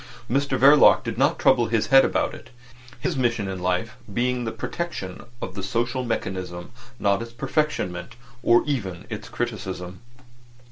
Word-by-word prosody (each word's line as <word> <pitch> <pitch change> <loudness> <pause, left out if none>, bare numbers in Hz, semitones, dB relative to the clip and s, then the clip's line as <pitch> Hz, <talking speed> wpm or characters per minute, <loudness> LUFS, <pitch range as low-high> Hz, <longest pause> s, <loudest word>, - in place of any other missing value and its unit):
Mr 135 +1 0
Verloc 140 +3 +7
did - - -3
not - - +3
trouble 125 -3 +4
his 110 0 +1
head 135 - +9
about - - 0
it, - - -12 0.5
his 165 +6 -1
mission 120 -6 0
in 95 -1 -4
life 90 0 -1
being 125 0 0
the 110 - -2
protection 170 - -5 0.2
of 95 - -5
the 100 - -5
social 120 +6 -1
mechanism, 95 -5 -4 0.3
not 100 -2 +1
its 115 0 -7
perfectionment 120 - -2 0.3
or 120 -1 +5
even 100 -12 -3
its - - -6
criticism. 90 -1 -4
115 Hz, 150 wpm, -24 LUFS, 95-130 Hz, 0.5 s, head